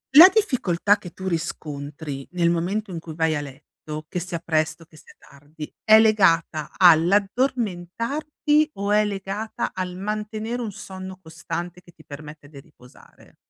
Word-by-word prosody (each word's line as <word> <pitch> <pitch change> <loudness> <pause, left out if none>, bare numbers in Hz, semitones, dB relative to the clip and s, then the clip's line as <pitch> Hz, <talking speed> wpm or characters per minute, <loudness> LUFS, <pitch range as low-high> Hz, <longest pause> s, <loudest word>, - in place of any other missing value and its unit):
La 345 +5 +12
difficoltà 210 - +2
che 180 -4 -9
tu 190 +3 -7
riscontri 145 -4 -5
nel 170 -1 +2
momento 190 +5 -2
in 170 - -4
cui 160 -1 -9
vai 160 -1 +1
a 145 - -2
letto, 150 +2 -9
che 180 - -3
sia 175 0 -4
presto 160 0 -1
che 160 -1 -22
sia - - -17
tardi, 145 +2 -12
è 220 0 +7
legata 170 -8 +3
all'addormentarti 230 - +2
o 200 +1 -3
è 210 0 +4
legata 200 +2 -4
al 180 -1 -4
mantenere 215 +4 -4
un 225 -3 -4
sonno 190 -1 -9
costante 170 +1 -6
che 175 - -19
ti 155 - -20
permette 150 0 -11
de 145 -1 -13
riposare? 130 -4 -19
180 Hz, 150 wpm, -23 LUFS, 155-210 Hz, -, La